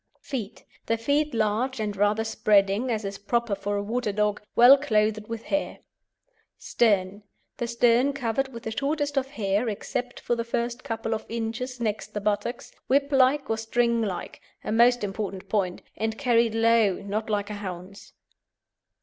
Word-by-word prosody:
FEET 230 -6 -6 0.2
The 230 - +1
feet 290 +6 +1
large 225 +4 0
and 210 -2 -2
rather 205 +2 +2
spreading 210 +1 +2
as 220 -3 -1
is 195 0 -5
proper 235 +1 0
for 205 +1 -2
a 200 - -2
water 225 +1 -1
dog, 210 0 0
well 245 +3 +9
clothed 215 -6 0
with 230 0 -5
hair. 295 +4 -2 0.8
STERN 200 -3 +1 0.4
The 240 - -2
stern 240 +3 +3
covered 270 -1 -1
with 230 -2 -9
the 225 - -4
shortest 290 +1 -1
of 270 -1 +1
hair, 215 -3 0
except 245 +4 -4
for - - -1
the 230 - -2
first 235 +1 -3
couple 225 0 -3
of 220 - -5
inches 235 +3 -4
next 215 -2 -3
the - - 0
buttocks, 210 +4 -2 0.2
whiplike 275 0 +3
or 225 - 0
stinglike 225 -3 -1 0.2
(a - - -3
most 240 +1 +4
important 195 -1 -4
point), 195 -3 -1
and 220 0 -2
carried 235 -4 +2
low, 225 -3 +4
not 215 +2 -3
like 205 -1 -1
a 205 -1 -6
hound's. 185 0 -8
225 Hz, 160 wpm, -26 LUFS, 205-245 Hz, 0.8 s, well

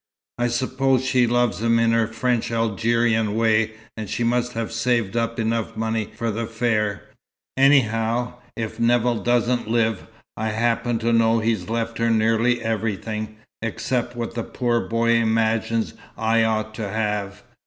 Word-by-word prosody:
"I 120 - +2
suppose 130 +2 +1
she 125 -2 +3
loves 120 -2 +1
him 115 0 +3
in 115 0 +3
her 115 -1 +2
French 115 +1 -1
Algerian 115 -1 +1
way, 110 -1 +2 0.2
and 110 -3 -6
she 120 - -1
must 125 +1 0
have 115 -1 -3
saved 115 -2 0
up 115 0 -1
enough 115 0 -1
money 110 -1 -1
for 115 0 -2
the 115 +2 -3
fare. 110 -3 -1 0.5
Anyhow, 120 -3 +3 0.2
if 110 0 -5
Nevill 120 0 +2
doesn't 120 -1 +1
live, 115 -3 0 0.3
I 110 - -2
happen 115 +2 0
to 115 - +3
know 115 0 +4
he's 110 -4 -1
left 115 0 -2
her 115 0 +2
nearly 115 +2 +2
everything, 110 -1 -3 0.3
except 120 +2 -2
what 120 -1 -4
the 115 - -2
poor 120 -1 0
boy 115 0 0
imagines 115 0 +1 0.2
I 110 +1 +2
ought 110 -1 -1
to 110 -2 -4
have. 105 -1 -2
115 Hz, 155 wpm, -23 LUFS, 110-120 Hz, 0.5 s, know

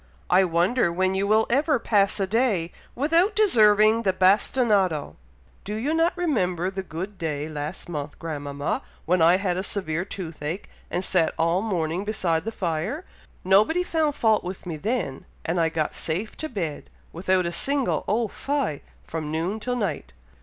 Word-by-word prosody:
I 185 +2 +6
wonder 175 +4 +2
when 185 +2 +1
you 195 +1 0
will 220 +1 +4
ever 290 +3 +3
pass 205 -3 +2
a 195 - +2
day 200 -5 +1 0.2
without 330 - +2
deserving 220 - +5
the 195 - +2
bastinado!" 190 - +2 0.5
"Do 210 - -4
you 265 +8 -1
not 330 +2 +2
remember 185 - 0
the 190 0 -4
good 190 +3 -7
day 150 -2 -2
last 150 -1 -6
month, 150 -3 -5
grandmama, 145 -3 -3 0.2
when 180 +1 +2
I 170 +3 +6
had 185 -2 -1
a - - 0
severe 180 -4 -2
toothache, 170 -2 -5 0.2
and 180 - -2
sat 175 -4 +2
all 170 +3 +2
morning 180 -4 -1
beside 180 -6 -1
the 225 - -2
fire? 185 - -3 0.4
Nobody 210 - +4
found 315 -4 0
fault 220 -5 +2
with 185 +2 -6
me 170 -3 -4
then, 195 - -3 0.2
and 170 +1 0
I 165 - +2
got 160 -1 -1
safe 180 +7 -3
to 315 - -4
bed, 170 - -4 0.2
without 185 +1 +1
a 170 - -1
single 275 +8 0
Oh 225 +3 +1
fie! 275 - -2 0.2
from 160 -2 -4
noon 170 +7 -1
till 250 +3 -2
night." 165 - -3
190 Hz, 165 wpm, -25 LUFS, 165-225 Hz, 0.5 s, I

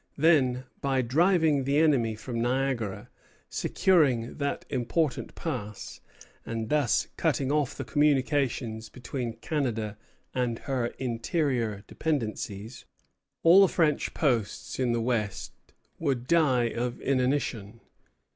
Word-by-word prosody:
Then, 135 -5 +3 0.2
by 135 -2 +1
driving 160 +2 +3
the 140 +2 +1
enemy 135 -8 +3
from 115 +2 -4
Niagara, 120 -5 -1 0.4
securing 140 -11 +2
that 140 0 -2
important 130 +4 -1
pass, 105 - -5 0.4
and 115 -1 -4
thus 145 -7 +2
cutting 135 -1 +1
off 150 -3 0
the 135 - -4
communication 135 -5 +1
between 125 -1 -5
Canada 115 -5 -3 0.3
and 125 -3 -1
her 130 -3 -2
interior 120 - -1
dependencies, 110 -7 -3 0.6
all 175 +4 +8
the 195 - +7
French 155 -4 +1
posts 120 -8 -1
in 125 -2 +1
the 120 0 0
West 115 -4 -2 0.5
would 135 -6 -1
die 140 -5 +3
of 120 +1 -3
inanition. 125 -5 -1
130 Hz, 110 wpm, -28 LUFS, 115-145 Hz, 0.6 s, all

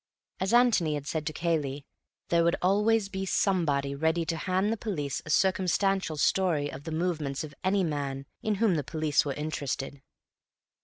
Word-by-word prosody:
As 190 +2 0
Antony 230 -11 +4
had 145 -1 -5
said 155 +2 -3
to - - 0
Cayley, 150 -5 -1 0.4
there 170 -1 +3
would 170 0 +3
always 210 +3 +2
be 190 -1 -4
somebody 160 -8 +1
ready 160 +3 0
to 165 - -1
hand 185 +5 0
the - - -4
police 155 - -3
a - - -6
circumstantial 190 +1 +2
story 150 -1 +1
of 135 +2 -9
the 165 - -4
movements 160 -4 -1
of 150 -2 -8
any 190 +1 +2
man 140 -4 -3 0.2
in 215 -1 0
whom 215 -1 +2
the 150 - -1
police 155 0 +1
were 140 - -1
interested. 140 -2 -4
165 Hz, 170 wpm, -28 LUFS, 145-190 Hz, 0.4 s, Antony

